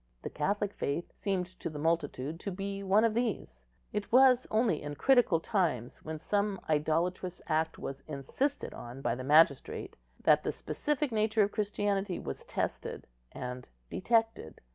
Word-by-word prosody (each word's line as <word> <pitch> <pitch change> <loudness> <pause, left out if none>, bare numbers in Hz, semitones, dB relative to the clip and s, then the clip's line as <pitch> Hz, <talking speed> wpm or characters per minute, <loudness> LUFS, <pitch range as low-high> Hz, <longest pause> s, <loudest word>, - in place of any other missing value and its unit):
The - - -5
Catholic 200 +6 -1
faith 145 +5 -3
seemed 190 -3 -1
to - - -3
the 155 - -7
multitude 155 -1 -1
to 200 - -4
be 195 +1 -4
one 200 +3 +4
of 225 - +2
these; 210 - -2 0.3
it 210 -1 -3
was 255 0 +6
only 215 -7 +2
in 145 0 -5
critical 245 - +4
times, 160 - -1
when 155 0 -5
some 200 +4 0
idolatrous 165 +4 0
act 160 0 0
was 135 0 -6
insisted 155 - -2
on 125 +3 -9
by - - +1
the 130 +2 -5
magistrate, 145 0 +3 0.3
that - - +5
the - - 0
specific 295 -2 -2
nature 215 0 +3
of 200 - 0
Christianity 205 -2 -1
was 70 - -6
tested - - -3 0.3
and 125 0 -6 0.2
detected. 225 - 0
180 Hz, 155 wpm, -31 LUFS, 150-210 Hz, 0.3 s, was